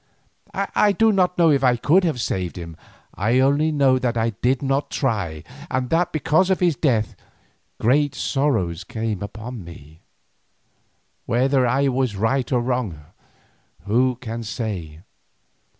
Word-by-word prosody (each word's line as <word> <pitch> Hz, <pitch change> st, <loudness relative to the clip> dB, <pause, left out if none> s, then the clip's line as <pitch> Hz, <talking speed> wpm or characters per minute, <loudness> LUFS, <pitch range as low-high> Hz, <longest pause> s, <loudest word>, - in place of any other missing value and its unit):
I 205 Hz, -1 st, +2 dB
do 225 Hz, +3 st, +3 dB
not 180 Hz, -3 st, +1 dB
know 165 Hz, -2 st, +5 dB
if 140 Hz, -2 st, +2 dB
I 125 Hz, -2 st, +4 dB
could 170 Hz, +10 st, +3 dB
have 155 Hz, -7 st, -1 dB
saved 90 Hz, -5 st, -2 dB
him, 85 Hz, -2 st, -8 dB, 0.4 s
I 115 Hz, +5 st, +1 dB
only 140 Hz, +4 st, +3 dB
know 135 Hz, -3 st, +3 dB
that 120 Hz, -2 st, -1 dB
I 115 Hz, 0 st, +1 dB
did 125 Hz, +6 st, -1 dB
not 140 Hz, +1 st, 0 dB
try, 100 Hz, -, -2 dB, 0.3 s
and 130 Hz, -1 st, -2 dB
that 170 Hz, +1 st, +2 dB
because 160 Hz, +4 st, +2 dB
of 190 Hz, -, +2 dB
his 175 Hz, -4 st, +2 dB
death 115 Hz, -9 st, 0 dB, 0.6 s
great 145 Hz, +4 st, +2 dB
sorrows 110 Hz, -, -1 dB
came 110 Hz, 0 st, -4 dB
upon 110 Hz, +2 st, -7 dB
me. 80 Hz, -2 st, -13 dB, 1.3 s
Whether 130 Hz, +2 st, +2 dB
I 135 Hz, +3 st, +2 dB
was 130 Hz, -4 st, -1 dB
right 120 Hz, +7 st, 0 dB
or 125 Hz, -2 st, +2 dB
wrong, 120 Hz, -, -3 dB, 0.8 s
who 125 Hz, +6 st, +2 dB
can 115 Hz, -1 st, -6 dB
say? 95 Hz, -8 st, -5 dB
125 Hz, 145 wpm, -22 LUFS, 105-140 Hz, 1.3 s, know